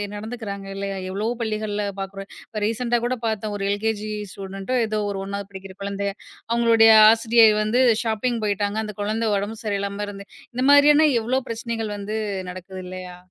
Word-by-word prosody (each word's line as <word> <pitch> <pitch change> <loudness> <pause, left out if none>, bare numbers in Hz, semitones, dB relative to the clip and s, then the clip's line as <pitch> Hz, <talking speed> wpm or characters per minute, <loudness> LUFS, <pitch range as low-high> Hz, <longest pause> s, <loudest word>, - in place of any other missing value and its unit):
நடந்துக்குறாங்க 205 -2 -6
இல்லையா? 195 0 -4
எவ்வளவோ 210 +5 -1
பள்ளிகள்ல 215 -2 -2 0.2
பாக்குறேன். 195 0 -6 0.2
இப்ப 215 -2 -5
ரீசென்ட்டா 235 +2 0
கூடப் 240 -1 -2
பாத்தோம், 215 -1 -2
ஒரு 195 - -3
எல்.கே.ஜி. 215 +1 -2 0.2
ஸ்டூடண்ட்டோ 195 +5 -4
ஏதோ 215 0 -1
ஒரு 195 - -4
1வது 200 0 -5
படிக்கிற 190 -1 -10
குழந்தை. 200 0 -2 0.4
அவுங்களுடைய 230 -1 +5 0.2
ஆசிரியர் 225 -1 +5
வந்து 225 +4 +2 0.2
ஷாப்பிங் 230 +1 -1
போயிட்டாங்க. 205 +1 -1
அந்த 210 -1 -7
குழந்தை 220 +2 -1
உடம்பு 205 +3 -4
சரியில்லாம 200 0 -2
இருந்து 200 0 -9 0.3
இந்த 255 +2 -1
மாரியான 295 +2 +7
எவ்வோ 250 +4 0
பிரச்சனைகள் 225 -1 -3
வந்து 205 +2 -4 0.3
நடக்குது 185 +1 -8
இல்லையா? 180 -1 -8
215 Hz, 155 wpm, -23 LUFS, 200-230 Hz, 0.4 s, மாரியான